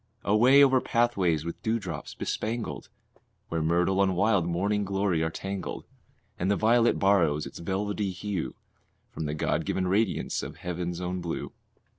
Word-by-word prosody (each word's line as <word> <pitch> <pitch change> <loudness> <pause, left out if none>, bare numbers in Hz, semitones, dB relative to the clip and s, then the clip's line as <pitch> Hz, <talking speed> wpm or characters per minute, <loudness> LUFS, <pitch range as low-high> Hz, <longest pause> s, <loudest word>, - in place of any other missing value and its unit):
Away 125 +7 +6
over 130 -2 +4
pathways 95 -10 +1
with 85 - -6
dewdrops 95 -9 -3
bespangled, 110 - -3 0.6
Where 80 -1 -1
myrtle 90 +4 +2
and 95 -2 +2
wild 100 -2 +2
morning 100 +4 0
glory 95 -3 0
are 80 - +1
tangled, 95 +3 -5 0.5
And 90 - 0
the 100 - +3
violet 115 +3 +3
borrows 85 -7 +3
its - - -9
velvety 100 +3 -2
hue 90 -7 -4 0.6
From 80 - -5
the 75 0 -2
God - - 0
given 95 -1 -1
radiance 100 +2 0
of - - -7
heaven's 90 0 -4
own 90 0 -3
blue. 85 -1 -4
95 Hz, 150 wpm, -28 LUFS, 85-105 Hz, 0.6 s, Away